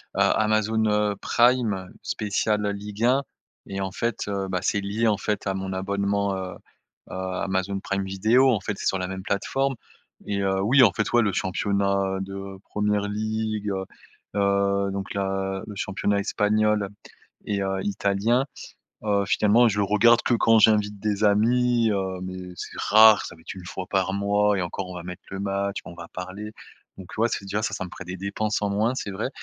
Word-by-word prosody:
Amazon, 110 Hz, 0 st, +2 dB
heu, 105 Hz, -1 st, +1 dB
Prime, 115 Hz, -6 st, +2 dB
spécial, 105 Hz, 0 st, -1 dB
heu, 100 Hz, -, +1 dB
Ligue 105 Hz, +2 st, -3 dB
1. 135 Hz, +3 st, +3 dB, 0.4 s
Et 95 Hz, -, -5 dB
en 95 Hz, -, -3 dB
fait, 115 Hz, +3 st, -2 dB
heu, 100 Hz, -1 st, -2 dB
bah, 90 Hz, -, 0 dB
c'est 100 Hz, -, +1 dB
lié, 105 Hz, +4 st, 0 dB
en 105 Hz, -2 st, +2 dB
fait, 105 Hz, 0 st, -2 dB
à 95 Hz, -, +1 dB
mon 95 Hz, 0 st, -4 dB
abonnement, 100 Hz, +1 st, -1 dB
heu 95 Hz, -1 st, -5 dB, 0.6 s
heu, -, -, -7 dB
Amazon 95 Hz, +1 st, -2 dB
Prime 100 Hz, 0 st, -2 dB
Video, 110 Hz, +8 st, +3 dB
en 110 Hz, -, +1 dB
fait, 105 Hz, 0 st, -4 dB
c'est -, -, -6 dB
sur 95 Hz, -, +2 dB
la 90 Hz, -, -2 dB
même 95 Hz, 0 st, -6 dB
plateforme 135 Hz, +8 st, -1 dB, 0.5 s
et 100 Hz, -1 st, -2 dB
heu, 95 Hz, 0 st, +1 dB
oui, 130 Hz, +7 st, +5 dB
en 110 Hz, -, +6 dB
fait, 105 Hz, -, -1 dB
ouais, 120 Hz, -, +6 dB
le 100 Hz, -2 st, 0 dB
championnat, 100 Hz, 0 st, 0 dB
heu, -, -, -3 dB
de 95 Hz, 0 st, -7 dB
Premier 105 Hz, 0 st, 0 dB
League, 110 Hz, 0 st, -2 dB
heu 95 Hz, -1 st, -2 dB, 0.5 s
heu, 100 Hz, 0 st, +2 dB
donc 100 Hz, 0 st, -4 dB
la 95 Hz, -1 st, -2 dB
le 105 Hz, -, -8 dB
championnat 100 Hz, +1 st, -1 dB
espagnol 105 Hz, 0 st, +1 dB, 0.6 s
et 100 Hz, -2 st, -1 dB
heu, 95 Hz, 0 st, -1 dB
italien, 100 Hz, +5 st, +1 dB, 0.6 s
heu, 100 Hz, -1 st, +2 dB
finalement 110 Hz, +4 st, +4 dB
je 105 Hz, -, -2 dB
le 100 Hz, -, +3 dB
regarde 115 Hz, +4 st, +4 dB
que -, -, 0 dB
quand 115 Hz, -1 st, +4 dB
j'invite 105 Hz, -1 st, +3 dB
des 105 Hz, -1 st, -1 dB
amis, 115 Hz, +3 st, +3 dB
heu, 95 Hz, -2 st, -2 dB
mais 95 Hz, 0 st, -6 dB
c'est -, -, -7 dB
rare, 110 Hz, 0 st, +6 dB
ça -, -, -9 dB
va 80 Hz, -, -19 dB
être -, -, -7 dB
1 95 Hz, -2 st, -10 dB
fois 95 Hz, +1 st, -5 dB
par 95 Hz, 0 st, +1 dB
mois 105 Hz, +1 st, +2 dB
et 90 Hz, -, 0 dB
encore, 90 Hz, +2 st, -4 dB
on -, -, -7 dB
va 90 Hz, -, -6 dB
mettre 90 Hz, 0 st, -8 dB
le 95 Hz, -, -5 dB
match, 100 Hz, 0 st, -2 dB
on 90 Hz, -, -9 dB
va 85 Hz, -1 st, -10 dB
parler. 95 Hz, +4 st, -7 dB, 0.5 s
Donc 95 Hz, -2 st, -10 dB
ouais, 115 Hz, -, +3 dB
c'est -, -, -3 dB
déjà 105 Hz, +2 st, -2 dB
ça, -, -, -1 dB
ça 95 Hz, -, -4 dB
me 90 Hz, -, -8 dB
ferait -, -, -9 dB
des 90 Hz, +1 st, -5 dB
dépenses 105 Hz, +2 st, -2 dB
en 100 Hz, -, 0 dB
moins, 110 Hz, +5 st, +1 dB
c'est 120 Hz, -6 st, -4 dB
vrai. 105 Hz, +6 st, -2 dB
100 Hz, 200 wpm, -25 LUFS, 95-105 Hz, 0.6 s, en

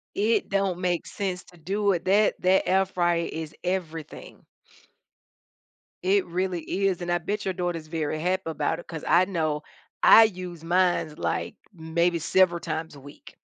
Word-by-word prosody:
It 220 Hz, +3 st, +1 dB
don't 195 Hz, -3 st, 0 dB
make 180 Hz, -2 st, -1 dB
sense 190 Hz, -2 st, -4 dB
to 175 Hz, -, -18 dB
do 200 Hz, +5 st, 0 dB
it. 175 Hz, -1 st, -3 dB
That 205 Hz, +3 st, +3 dB
that 185 Hz, +1 st, +3 dB
air 190 Hz, +1 st, +3 dB
fryer 175 Hz, -2 st, 0 dB
is 160 Hz, -1 st, -6 dB
everything. 165 Hz, -4 st, -5 dB, 1.6 s
It 195 Hz, +1 st, +2 dB
really 180 Hz, 0 st, -2 dB, 0.2 s
is, 185 Hz, -2 st, 0 dB
and 175 Hz, -, -4 dB
I 175 Hz, -, +2 dB
bet 200 Hz, +5 st, -4 dB
your 190 Hz, -, -1 dB
daughter's 175 Hz, -3 st, -3 dB
very 155 Hz, -1 st, -2 dB
happy 185 Hz, +3 st, 0 dB
about 160 Hz, 0 st, -1 dB
it -, -, -11 dB
'cause 160 Hz, -2 st, -7 dB
I 175 Hz, +2 st, +5 dB
know 155 Hz, -5 st, -2 dB, 0.4 s
I 225 Hz, -, +9 dB
use 180 Hz, -5 st, -6 dB
mines, 175 Hz, -2 st, +1 dB
like, -, -, -2 dB, 0.2 s
maybe 170 Hz, +1 st, 0 dB
several 175 Hz, +1 st, +3 dB
times 160 Hz, -2 st, -5 dB
a -, -, -12 dB
week. 145 Hz, +2 st, -14 dB
175 Hz, 165 wpm, -26 LUFS, 165-190 Hz, 1.6 s, I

